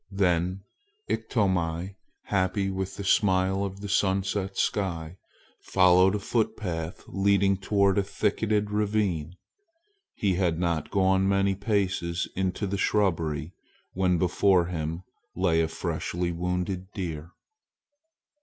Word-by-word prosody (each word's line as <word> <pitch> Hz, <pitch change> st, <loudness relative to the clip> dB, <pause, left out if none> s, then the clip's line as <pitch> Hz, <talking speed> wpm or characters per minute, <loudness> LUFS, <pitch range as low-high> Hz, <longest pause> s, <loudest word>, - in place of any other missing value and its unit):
Then 90 Hz, -1 st, 0 dB, 0.4 s
Iktomi, 95 Hz, -6 st, -1 dB, 0.3 s
happy 95 Hz, +1 st, 0 dB
with 95 Hz, 0 st, -4 dB
the 100 Hz, -, -4 dB
smile 95 Hz, -1 st, +2 dB
of 100 Hz, 0 st, -5 dB
the 105 Hz, -, -5 dB
sunset 95 Hz, 0 st, 0 dB
sky, 85 Hz, -4 st, -1 dB, 0.4 s
followed 95 Hz, +1 st, +4 dB
a -, -, -1 dB
footpath 95 Hz, -6 st, -2 dB
leading 100 Hz, 0 st, +2 dB
toward 100 Hz, 0 st, +2 dB
a -, -, +1 dB
thicketed 105 Hz, +1 st, 0 dB
ravine. 100 Hz, -6 st, 0 dB, 0.8 s
He 100 Hz, -3 st, +1 dB
had 90 Hz, -3 st, +1 dB
not 85 Hz, -2 st, -1 dB
gone 95 Hz, -1 st, +2 dB
many 100 Hz, 0 st, +2 dB
paces 95 Hz, -4 st, -1 dB
into 95 Hz, +2 st, -1 dB
the 100 Hz, 0 st, -2 dB
shrubbery 80 Hz, -6 st, 0 dB, 0.4 s
when 90 Hz, -1 st, +2 dB
before 90 Hz, +1 st, +3 dB
him 85 Hz, 0 st, -4 dB, 0.3 s
lay 85 Hz, -3 st, +2 dB
a 80 Hz, -, +1 dB
freshly 85 Hz, +2 st, -3 dB
wounded 90 Hz, +2 st, -3 dB
deer! 85 Hz, -4 st, -5 dB
95 Hz, 115 wpm, -27 LUFS, 90-100 Hz, 0.8 s, followed